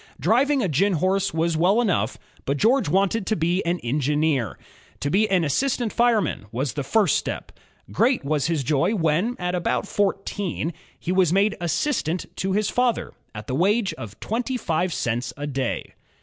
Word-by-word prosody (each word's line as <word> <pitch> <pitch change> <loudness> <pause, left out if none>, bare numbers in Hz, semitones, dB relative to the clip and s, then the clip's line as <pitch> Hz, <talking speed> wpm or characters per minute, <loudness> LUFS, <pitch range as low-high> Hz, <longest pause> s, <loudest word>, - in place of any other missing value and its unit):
Driving 260 - +3
a - - +1
gin 185 +6 +2
horse 190 +4 +1
was 165 +1 0
well 180 +8 +3
enough, 175 - 0 0.3
but 140 +1 0
George 230 - +3
wanted 195 +4 +1
to 220 - +1
be 175 +2 0
an 175 +1 0
engineer. 145 -1 0 0.4
To 145 - -1
be 210 +5 +3
assistant 210 - +1
fireman 225 - +1
was 130 +3 -2
the 145 - -3
first 205 +8 +2
step. - - -5 0.4
Great 245 - +2
was 150 0 0
his 165 -4 0
joy 155 - +1
when, 175 +7 +1
at 180 0 -2
about 180 +3 -1
fourteen, 195 -4 -1 0.3
he 175 - -3
was 185 -3 +3
made 200 +3 +3
assistant 175 - -1
to 190 0 -1
his 210 0 +1
father, 245 0 0 0.2
at 105 0 -7
the 130 - -4
wage 200 - +2
of 110 -2 -9
twenty 245 +4 -2
five 175 -4 -1
cents 120 -4 -2
a 145 - -4
day. 135 -3 -3
180 Hz, 170 wpm, -24 LUFS, 150-210 Hz, 0.4 s, Driving